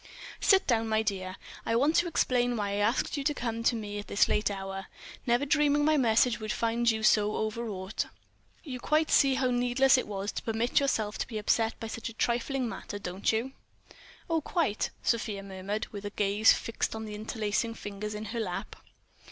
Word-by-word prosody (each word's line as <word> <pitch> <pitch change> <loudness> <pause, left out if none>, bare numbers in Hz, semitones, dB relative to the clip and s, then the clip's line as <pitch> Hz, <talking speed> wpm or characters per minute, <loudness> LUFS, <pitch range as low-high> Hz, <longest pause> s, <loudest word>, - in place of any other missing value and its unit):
"Sit 390 -1 +4
down, 225 -3 +1
my 220 0 +2
dear. 185 -3 -3 0.3
I 230 - 0
want 285 +7 +3
to 345 - +3
explain 245 -6 +1
why 205 -1 -1
I 200 - -1
asked 220 +8 +1
you 280 - -2
to 295 +1 +1
come 230 -3 -3
to 235 - +2
me 205 -2 -4
at 205 - -8
this 200 - +3
late 210 -1 +1
hour—never 195 +6 -3
dreaming 295 0 +3
my 310 0 +4
message 235 -2 +3
would 215 -1 -3
find 235 +1 +1
you 220 -1 0
so 210 -1 +4
overwrought.... 215 -3 -3 0.6
You 255 -5 -6
quite 305 +5 +1
see 270 -1 +5
how 260 -1 +1
needless 250 +2 +4
it - - -4
was 200 0 -3
to - - -4
permit 225 +2 +1
yourself 220 -7 -1
to - - -2
be 225 - -5
upset 225 +2 +1
by - - -5
such 225 +1 -5
a - - -10
trifling 245 +3 0
matter, 215 -2 -6
don't 190 0 -1
you?" 230 +4 -1 0.8
"Oh, 330 -2 +1
quite," 305 - 0
Sofia 215 -4 0
murmured, 195 +2 -4
with 205 0 -7
gaze 205 +2 +4
fixed 230 - -1
on 220 0 -5
the 210 - -7
interlacing 215 +1 -2
fingers 210 0 -6
in 210 +1 -5
her 235 - -2
lap. 185 -6 -4
225 Hz, 195 wpm, -29 LUFS, 210-250 Hz, 0.8 s, see